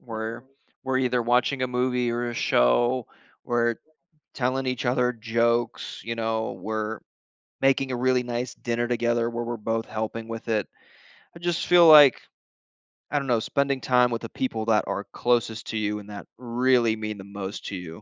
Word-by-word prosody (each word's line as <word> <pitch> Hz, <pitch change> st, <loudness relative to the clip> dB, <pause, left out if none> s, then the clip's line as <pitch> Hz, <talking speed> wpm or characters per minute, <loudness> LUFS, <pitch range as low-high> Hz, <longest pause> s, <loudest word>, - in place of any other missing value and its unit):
we're 115 Hz, 0 st, -6 dB, 0.4 s
we're 130 Hz, -1 st, 0 dB
either 125 Hz, -1 st, +1 dB
watching 125 Hz, +3 st, +1 dB
a -, -, +2 dB
movie 125 Hz, -1 st, 0 dB
or 120 Hz, +1 st, -2 dB
a 120 Hz, -, -6 dB
show. 120 Hz, -, +2 dB, 0.4 s
We're 120 Hz, -1 st, +1 dB, 0.6 s
telling 130 Hz, +1 st, -1 dB
each 125 Hz, -2 st, -2 dB
other 125 Hz, 0 st, +2 dB
jokes, 115 Hz, +1 st, -1 dB
you 115 Hz, +1 st, -4 dB
know? 110 Hz, -1 st, -2 dB
We're 110 Hz, 0 st, -3 dB, 0.6 s
making 135 Hz, 0 st, +2 dB
a 125 Hz, -, -1 dB
really 125 Hz, 0 st, +2 dB
nice 120 Hz, 0 st, -3 dB
dinner 120 Hz, 0 st, -2 dB
together, 120 Hz, -1 st, 0 dB
where 120 Hz, 0 st, -4 dB
we're 120 Hz, 0 st, -4 dB
both 115 Hz, +1 st, -2 dB
helping 110 Hz, +1 st, -4 dB
with 115 Hz, 0 st, -7 dB
it. 110 Hz, -3 st, 0 dB, 0.7 s
I -, -, -11 dB
just 175 Hz, -1 st, -1 dB
feel 175 Hz, -1 st, +7 dB
like, 145 Hz, -5 st, +8 dB, 0.9 s
I 145 Hz, -, +2 dB
don't 140 Hz, -, -5 dB
know, 120 Hz, -3 st, +2 dB
spending 140 Hz, +3 st, 0 dB
time 125 Hz, 0 st, +3 dB
with 115 Hz, -, -2 dB
the -, -, -4 dB
people 115 Hz, -4 st, -3 dB
that 110 Hz, -2 st, +2 dB
are 100 Hz, -, -3 dB
closest 115 Hz, -2 st, 0 dB
to 110 Hz, -, -3 dB
you, 105 Hz, 0 st, -1 dB
and 105 Hz, 0 st, -12 dB
that 100 Hz, -1 st, -8 dB
really 120 Hz, -1 st, +2 dB
mean 110 Hz, -1 st, -5 dB
the 95 Hz, -, -8 dB
most 100 Hz, 0 st, -7 dB
to -, -, -5 dB
you, 90 Hz, +2 st, -8 dB
120 Hz, 180 wpm, -25 LUFS, 110-125 Hz, 0.9 s, like